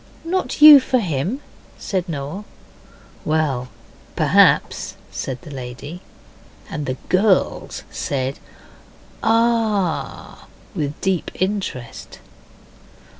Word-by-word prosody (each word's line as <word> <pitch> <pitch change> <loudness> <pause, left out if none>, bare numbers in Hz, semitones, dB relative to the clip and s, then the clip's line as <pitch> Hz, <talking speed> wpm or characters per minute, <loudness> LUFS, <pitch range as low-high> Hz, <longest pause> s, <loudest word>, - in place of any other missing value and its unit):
'Not 350 -3 -1
you 300 -2 +12
for 260 0 0
him?' 185 - -2 0.4
said 185 -2 -3
Noel. 150 +6 -5 0.8
'Well, 150 -5 0 0.5
perhaps,' - - +3 0.2
said 130 -1 -4
the 155 - -10
lady. 135 +6 -8 0.7
And 150 -3 -4
the 130 0 -2
girls 190 +1 +1
said 135 -1 -3 0.8
'Ah!' 225 -5 0 0.3
with 150 -6 -3
deep 190 -3 0
interest. 185 - -4
175 Hz, 85 wpm, -21 LUFS, 140-210 Hz, 0.8 s, you